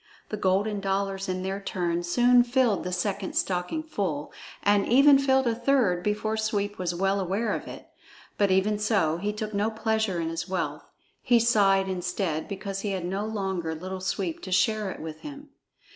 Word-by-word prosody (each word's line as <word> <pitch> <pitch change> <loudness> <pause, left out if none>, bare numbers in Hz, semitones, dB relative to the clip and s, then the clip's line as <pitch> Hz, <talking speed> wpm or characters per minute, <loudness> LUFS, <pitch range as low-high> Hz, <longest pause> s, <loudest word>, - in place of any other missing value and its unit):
The - - -2
golden 200 +1 +1
dollars 195 0 -2
in 185 0 -2
their 195 +1 -3
turn 175 -3 -1
soon 245 +8 +4
filled 240 -4 +1
the 180 - -4
second 195 +1 -2
stocking 180 - -1
full, 185 - -3 0.3
and 205 -1 +3
even 275 +3 +6
filled 265 -1 +3
a 235 - +2
third 230 -7 +2
before 210 +2 -1
Sweep 205 -2 -1
was 175 -1 -2
well 195 +2 +1
aware 195 +4 -1
of - - -4
it. - - -9 0.5
But 200 -1 +2
even 195 +3 +2
so, 200 -7 +1
he 205 +4 -2
took 215 0 -5
no 205 +2 +1
pleasure 220 -4 -1
in 165 -1 -2
his 165 +2 -4
wealth; 190 - -3 0.3
he 240 -2 +4
sighed 200 -4 +3
instead 180 -3 -2
because 195 0 -5
he 200 0 -2
had 185 -2 -3
no 195 +4 -2
longer 190 -6 -2
Little 185 +3 -6
Sweep 185 -3 -2
to 185 - -7
share 215 +2 +2
it - - -7
with 155 -1 -7
him. 290 0 -10
195 Hz, 185 wpm, -27 LUFS, 185-220 Hz, 0.5 s, even